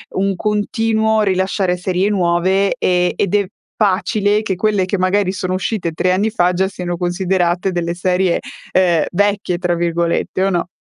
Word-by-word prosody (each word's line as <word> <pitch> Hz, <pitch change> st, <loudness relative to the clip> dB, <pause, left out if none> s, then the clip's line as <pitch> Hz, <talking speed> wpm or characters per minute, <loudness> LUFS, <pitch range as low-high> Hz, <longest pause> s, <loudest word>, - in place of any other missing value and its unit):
un 195 Hz, 0 st, 0 dB
continuo 220 Hz, +2 st, 0 dB
rilasciare 190 Hz, -2 st, 0 dB
serie 185 Hz, +2 st, 0 dB
nuove, 190 Hz, +2 st, +1 dB
ehm, 180 Hz, -4 st, +1 dB
ed 200 Hz, 0 st, 0 dB
è 205 Hz, -1 st, +2 dB, 0.3 s
facile 205 Hz, +1 st, +1 dB
che 195 Hz, -3 st, -2 dB
quelle 205 Hz, 0 st, +1 dB
che 195 Hz, +2 st, -2 dB
magari 185 Hz, +1 st, +1 dB
sono 185 Hz, -1 st, -3 dB
uscite 185 Hz, -2 st, -2 dB
3 185 Hz, +3 st, +1 dB
anni 200 Hz, +4 st, +1 dB
fa, 180 Hz, -5 st, +2 dB
già 190 Hz, +2 st, +1 dB
siano 180 Hz, -2 st, -4 dB
considerate 180 Hz, 0 st, 0 dB
delle 170 Hz, -1 st, -2 dB
serie, 180 Hz, 0 st, +1 dB, 0.3 s
ehm, 175 Hz, -4 st, +3 dB
"vecchie" 200 Hz, -1 st, 0 dB
tra 175 Hz, -1 st, 0 dB
virgolette, 170 Hz, +2 st, -1 dB
o 195 Hz, -, +2 dB
no? 175 Hz, -2 st, -1 dB
185 Hz, 160 wpm, -17 LUFS, 180-200 Hz, 0.3 s, ehm